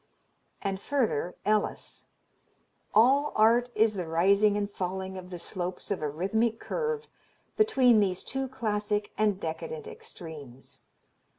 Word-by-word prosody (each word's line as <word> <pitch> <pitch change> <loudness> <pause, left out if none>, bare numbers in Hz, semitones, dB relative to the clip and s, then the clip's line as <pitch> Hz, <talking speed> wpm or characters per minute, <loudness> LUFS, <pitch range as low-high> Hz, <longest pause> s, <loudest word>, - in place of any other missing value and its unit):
And 195 -1 -2
further, 225 - 0
Ellis: 215 0 -1 0.9
"All 270 +7 +4
art 235 +3 +4
is 220 0 +4
the 180 -4 -4
rising 200 +5 +3
and 205 -1 0
falling 190 -1 -4
of 185 -1 -8
the 180 - -6
slopes 180 +2 -5
of 200 - -1
a 150 - -1
rhythmic 220 +9 0
curve 460 -1 -2 0.5
between 260 - +5
these 190 -3 0
two 270 0 -3
classic 210 -4 -2
and 210 -3 +1
decadent 430 - -5
extremes. 160 - -10
210 Hz, 125 wpm, -28 LUFS, 185-245 Hz, 0.9 s, between